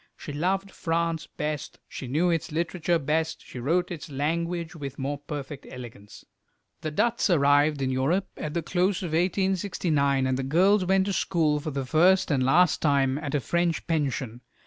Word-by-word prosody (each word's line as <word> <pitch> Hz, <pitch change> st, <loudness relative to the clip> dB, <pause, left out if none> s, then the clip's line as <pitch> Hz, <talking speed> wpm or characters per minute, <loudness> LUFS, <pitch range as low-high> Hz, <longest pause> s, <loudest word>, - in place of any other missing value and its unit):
She 145 Hz, -, -7 dB
loved 190 Hz, +6 st, -1 dB
France 165 Hz, -1 st, -1 dB
best, 150 Hz, -1 st, -4 dB
she 130 Hz, -, -7 dB
knew 160 Hz, +8 st, +2 dB
its 165 Hz, -2 st, -2 dB
literature 170 Hz, +1 st, 0 dB
best, 160 Hz, +2 st, -1 dB
she 125 Hz, -, -8 dB
wrote 175 Hz, +9 st, 0 dB
its 165 Hz, -2 st, -7 dB
language 170 Hz, +4 st, -2 dB
with 140 Hz, -4 st, -7 dB
more 140 Hz, +1 st, -3 dB
perfect 145 Hz, -1 st, -7 dB
elegance. 115 Hz, -5 st, -11 dB, 0.6 s
The 155 Hz, -, -2 dB
Dutts 230 Hz, +9 st, +1 dB
arrived 145 Hz, -2 st, +3 dB
in 130 Hz, -, 0 dB
Europe 145 Hz, +9 st, +1 dB
at 150 Hz, 0 st, -5 dB
the 170 Hz, -, -1 dB
close 185 Hz, +3 st, 0 dB
of 175 Hz, -, -3 dB
1869, 170 Hz, -5 st, +1 dB
and 130 Hz, 0 st, 0 dB
the -, -, -1 dB
girls 185 Hz, +8 st, +3 dB
went 190 Hz, +1 st, +3 dB
to 200 Hz, -, -1 dB
school, 160 Hz, -5 st, +1 dB
for 155 Hz, +2 st, -4 dB
the 135 Hz, -2 st, -3 dB
first 175 Hz, +7 st, +4 dB
and 135 Hz, -3 st, +2 dB
last 160 Hz, +6 st, +4 dB
time, 140 Hz, -2 st, +2 dB
at 150 Hz, -2 st, -3 dB
a -, -, +2 dB
French 170 Hz, +4 st, 0 dB
pension. 135 Hz, -7 st, -2 dB
155 Hz, 175 wpm, -26 LUFS, 140-175 Hz, 0.6 s, first